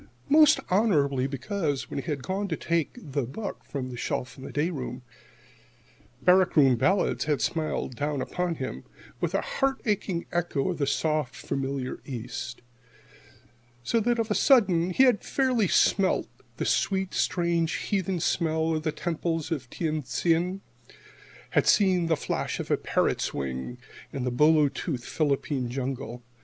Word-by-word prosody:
Most 305 0 +7
honorably, 145 - +2
because, 145 - -3
when - - -2
he - - -6
had 140 -4 -2
gone 195 +5 -2
to 160 -5 -2
take 170 -2 0
the 145 - -3
book 140 - -6
from 130 -2 -5
its 120 - -7
shelf 125 +1 -3
in 130 - -11
the - - -7
day 155 +5 0
room, 130 -4 -5 1.2
"Barrack 185 0 +5
Room 135 -5 +6
Ballads"[68 190 - +1
1] - - +3
had 145 - -2
smiled 155 -5 -2
down 145 -1 -1
upon 180 +5 -2
him 130 -3 -5 0.4
with - - -1
a - - +2
heart 270 - -1
aching 200 -5 -1
echo 175 -3 0
of 175 - -3
the 140 - +1
soft, 150 -3 0
familiar 135 -1 -3
East; 120 -1 -6 1.2
so 230 - +1
that 240 +2 +1
of 225 -1 -1
a - - +5
sudden 195 - +4
he 220 +8 +4
had 250 -5 +4
fairly 255 -6 +1
smelt 190 +2 +3 0.3
the - - -2
sweet, 190 -1 0
strange, 170 -1 +1
heathen 190 -3 -1
smell 160 -1 +1
of 155 - -1
the 155 0 -1
temples 165 0 -2
in 160 - +1
Tien 155 0 -2
Tsin 170 +8 0 0.9
had - - +2
seen 185 -4 +4
the 160 -2 +2
flash - - -2
of - - -4
a - - +4
parrot's - - 0
wing 65 -2 -4 0.3
in 135 - -4
the 125 - -1
bolo 150 +3 +5
toothed 135 -2 -4
Philippine 140 -4 -1
jungle. 125 -1 -4
160 Hz, 160 wpm, -27 LUFS, 135-185 Hz, 1.2 s, Most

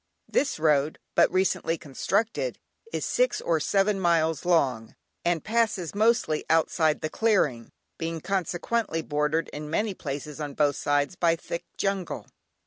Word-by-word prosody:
This 280 - +1
road, 150 -1 +2 0.2
but - - +4
recently 185 -2 +1
constructed, 205 - -1 0.3
is - - -2
six - - +1
or 165 -2 +1
seven 195 +5 +2
miles 165 -3 +2
long, 130 -10 +1 0.3
and 170 -2 +1
passes 215 -6 0
mostly 215 -7 +2
outside 160 -1 +2
the - - -1
clearing, 155 - +1 0.3
being 165 0 -3
consequently 180 +1 -1
bordered 150 +2 0
in 150 0 -7
many 205 +6 0
places 150 -2 -6
on 145 -2 -5
both 145 -1 +2
sides 145 +4 0
by 170 -2 +3
thick 170 0 -6
jungle. 195 -3 -2
165 Hz, 135 wpm, -27 LUFS, 150-195 Hz, 0.3 s, but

